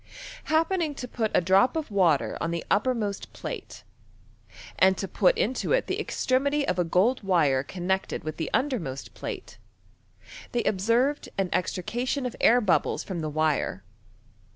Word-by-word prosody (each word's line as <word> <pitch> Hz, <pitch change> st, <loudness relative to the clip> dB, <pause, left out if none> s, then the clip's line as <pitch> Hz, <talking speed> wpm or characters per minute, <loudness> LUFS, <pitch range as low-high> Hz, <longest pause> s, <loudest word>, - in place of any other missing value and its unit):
Hap 320 Hz, +3 st, +2 dB
pening 335 Hz, -6 st, 0 dB
to 250 Hz, -, -5 dB
put 225 Hz, -2 st, -1 dB
a -, -, +5 dB
drop 190 Hz, -, +4 dB
of 310 Hz, -7 st, -3 dB
water 175 Hz, -8 st, +2 dB
on 165 Hz, -, -1 dB
the 170 Hz, 0 st, -3 dB
uppermost 210 Hz, -3 st, 0 dB
plate, -, -, -7 dB, 1.0 s
and 190 Hz, 0 st, +5 dB
to 195 Hz, -, -3 dB
put 185 Hz, 0 st, +2 dB
into 255 Hz, -, 0 dB
it -, -, +2 dB
the -, -, -2 dB
extremity 280 Hz, +3 st, 0 dB
of 180 Hz, -, 0 dB
a -, -, +4 dB
gold 190 Hz, +10 st, +2 dB
wire 165 Hz, -9 st, +2 dB
connected 190 Hz, +5 st, -2 dB
with 155 Hz, 0 st, -5 dB
the 160 Hz, -, -3 dB
undermost 210 Hz, -, -2 dB
plate, -, -, -7 dB, 0.9 s
they 240 Hz, -, +1 dB
observed 230 Hz, +9 st, +1 dB
a& 195 Hz, -2 st, 0 dB
extrication 240 Hz, +10 st, -2 dB
of 250 Hz, -, -4 dB
air 240 Hz, +2 st, +6 dB
bubbles 195 Hz, -6 st, +1 dB
from 185 Hz, -4 st, -5 dB
the 155 Hz, -1 st, -3 dB
wire. 150 Hz, -10 st, 0 dB
200 Hz, 155 wpm, -26 LUFS, 175-255 Hz, 1.0 s, air